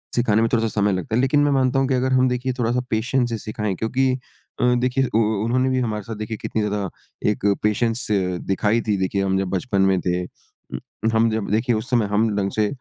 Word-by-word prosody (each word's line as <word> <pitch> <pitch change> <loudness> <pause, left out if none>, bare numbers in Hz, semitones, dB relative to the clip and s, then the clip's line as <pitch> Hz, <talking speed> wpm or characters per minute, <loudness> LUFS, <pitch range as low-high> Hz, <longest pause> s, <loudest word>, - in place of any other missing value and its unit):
सिखाने 110 -3 +2
में 115 - +2
थोड़ा-सा 115 -1 +2
समय 105 - +3
लगता 110 +5 -2
है। 125 - +3
लेकिन 135 +2 +2
मैं 145 - +2
मानता 135 0 +2
हूँ 135 - +1
कि 135 - 0
अगर 130 +1 +1
हम 130 0 +4
देखिए 125 +1 -1
थोड़ा-सा 120 +1 +1
पेशेंस 120 +2 0
से 115 - -2
सिखाएँ 105 -2 -3
क्योंकि 130 +6 0 0.5
अ, 125 0 +4
देखिए 125 +2 +1
उ - - +5
उ 110 -2 +1
उन्होंने 130 +3 +1
भी 130 0 +1
हमारे 105 -4 -2
साथ 115 +1 -6
देखिए 110 +1 -5
कितनी 110 - -3
ज़्यादा 105 -2 -2 0.4
एक 105 -1 -2 0.2
पेशेंस 115 +3 0
दिखाई 95 +3 0
थी, 105 - +2
देखिए 95 +1 -1
हम 95 0 +1
जब 95 - -1
बचपन 95 +1 0
में 95 -1 +3
थे। 90 0 +1 0.9
हम 115 0 +3
जब 110 -3 -2
देखिए 115 +2 +1
उस 110 +3 -4
समय 120 -4 +2
हम 105 +2 +1
ढंग 100 -1 0
से 105 -1 +2
110 Hz, 225 wpm, -22 LUFS, 105-125 Hz, 0.9 s, उ